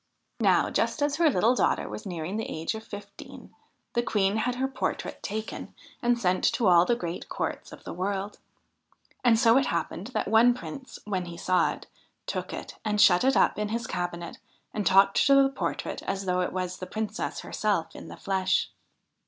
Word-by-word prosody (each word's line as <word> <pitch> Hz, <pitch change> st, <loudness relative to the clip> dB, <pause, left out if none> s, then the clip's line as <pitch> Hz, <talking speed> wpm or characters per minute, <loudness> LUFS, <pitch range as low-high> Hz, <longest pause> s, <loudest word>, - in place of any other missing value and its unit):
Now, -, -, +3 dB
just 290 Hz, -, 0 dB
as 290 Hz, 0 st, 0 dB
her 335 Hz, -2 st, +5 dB
little 230 Hz, 0 st, +3 dB
daughter -, -, +1 dB
was 215 Hz, -, -7 dB
nearing 175 Hz, +2 st, -4 dB
the 225 Hz, -, -3 dB
age 160 Hz, +6 st, -3 dB
of 220 Hz, 0 st, -7 dB
fifteen, 205 Hz, -2 st, -11 dB, 0.4 s
the 240 Hz, -, +2 dB
Queen 205 Hz, -3 st, +1 dB
had 245 Hz, +3 st, 0 dB
her 265 Hz, +1 st, 0 dB
portrait 265 Hz, -, -3 dB
taken 215 Hz, +1 st, -5 dB, 0.3 s
and 240 Hz, 0 st, +2 dB
sent 185 Hz, -5 st, +1 dB
to 240 Hz, -, 0 dB
all 175 Hz, -2 st, +6 dB
the 240 Hz, -, +2 dB
great 175 Hz, -6 st, -5 dB
courts -, -, -4 dB
of -, -, -12 dB
the -, -, -6 dB
world. 195 Hz, +3 st, -3 dB, 0.8 s
And 235 Hz, -3 st, +5 dB
so 230 Hz, +1 st, +5 dB
it 275 Hz, -, 0 dB
happened 170 Hz, +3 st, -2 dB
that -, -, 0 dB
one 230 Hz, +3 st, +5 dB
Prince, 260 Hz, +1 st, -8 dB
when 190 Hz, -4 st, -2 dB
he 170 Hz, -1 st, -8 dB
saw 185 Hz, +1 st, +2 dB
it, -, -, -12 dB, 0.4 s
took -, -, -4 dB
it -, -, -8 dB
and 210 Hz, -1 st, 0 dB
shut 205 Hz, -2 st, +6 dB
it 265 Hz, +1 st, +3 dB
up -, -, +3 dB
in 210 Hz, 0 st, -1 dB
his 230 Hz, +1 st, -2 dB
cabinet 175 Hz, -3 st, -4 dB, 0.3 s
and 210 Hz, -2 st, -1 dB
talked 195 Hz, +1 st, +5 dB
to 275 Hz, -, +6 dB
the 275 Hz, 0 st, +6 dB
portrait 270 Hz, -, -3 dB
as 195 Hz, 0 st, -3 dB
though 180 Hz, 0 st, +1 dB
it 180 Hz, -, -1 dB
was 185 Hz, -1 st, -3 dB
the 185 Hz, -, -6 dB
Princess 215 Hz, +2 st, -3 dB
herself 200 Hz, -6 st, -1 dB
in -, -, -9 dB
the -, -, -10 dB
flesh. 190 Hz, -1 st, 0 dB
205 Hz, 195 wpm, -27 LUFS, 185-235 Hz, 0.8 s, all